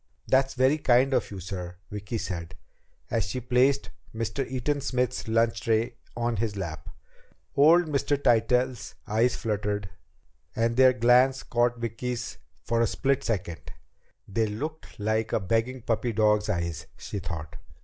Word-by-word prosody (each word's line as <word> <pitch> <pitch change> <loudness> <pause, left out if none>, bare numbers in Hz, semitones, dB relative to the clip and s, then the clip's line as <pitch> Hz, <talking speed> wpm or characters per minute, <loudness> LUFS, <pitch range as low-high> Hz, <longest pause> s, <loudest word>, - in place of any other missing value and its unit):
"That's 135 +1 +2
very 130 +4 +3
kind 130 0 +4
of - - +1
you, 100 - -7
sir," 90 -1 -6 0.2
Vicki 105 +2 -4
said, 85 -6 -5 0.6
as 115 -3 +1
she 105 +5 -3
placed 125 +3 +2 0.2
Mr. 115 +4 -2
Eaton 135 +3 -1
Smith's 125 -2 -1
lunch 115 +1 +2
tray 115 +2 +1 0.2
on 120 -1 0
his 105 0 -1
lap. 85 -3 -5 0.7
Old 165 +5 +6
Mr. 145 -1 0
Tytell's 125 0 +1
eyes 115 +4 +2
fluttered, 105 -2 -2 0.6
and 115 +1 +1
their 130 0 +6
glance 125 +2 +4
caught 120 0 +1
Vicki's 115 +1 -4 0.2
for 115 0 +1
a 115 - +3
split 135 -1 0
second. 85 -7 -3 0.5
They 110 +3 0
looked 150 +10 -6
like 110 +1 0
a - - +3
begging 115 +5 -1
puppy 115 +1 0
dog's 105 0 +3
eyes, 85 -5 -2
she 100 - -5
thought. 85 -2 -6
115 Hz, 145 wpm, -27 LUFS, 105-125 Hz, 0.7 s, Old